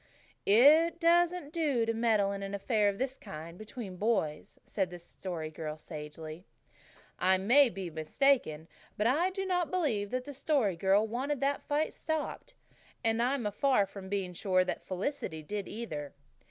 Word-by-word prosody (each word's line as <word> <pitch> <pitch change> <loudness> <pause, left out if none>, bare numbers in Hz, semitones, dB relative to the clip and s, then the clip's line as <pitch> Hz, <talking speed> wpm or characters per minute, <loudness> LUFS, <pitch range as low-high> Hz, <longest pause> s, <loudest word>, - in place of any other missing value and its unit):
"It 305 +10 +6
doesn't 345 -2 +3
do 290 -9 +1
to 230 - 0
meddle 220 -3 +2
in 200 0 -4
an 195 0 -4
affair 210 0 +2
of 200 - -3
this 265 +1 -2
kind 170 -4 -9
between 210 -1 -8
boys," 185 -8 -1
said 190 -3 -1
the 175 - -8
Story 170 -2 -6
Girl 155 -1 -5
sagely. 155 +1 -8 0.8
I 190 +1 +4
may 245 +8 +5
be 185 -4 -6
mistaken, 160 - +1 0.3
but 210 - 0
I 305 +10 +3
do 385 +1 -4
not 360 -3 0
believe 270 - 0
the 255 +4 -4
Story 260 - +1
Girl 195 +5 +3
wanted 260 +5 -2
that 280 +1 +1
fight 295 +2 0
stopped. 315 +10 -4 0.5
And 225 0 +2
I 255 +3 +2
am 225 -6 -2
far 255 -1 +3
from 195 -1 -10
being 190 -3 -2
sure 185 +1 +2
that 185 - -3
Felicity 185 - -3
did 205 +5 -4
either. 155 -12 -6
210 Hz, 165 wpm, -31 LUFS, 185-280 Hz, 0.8 s, It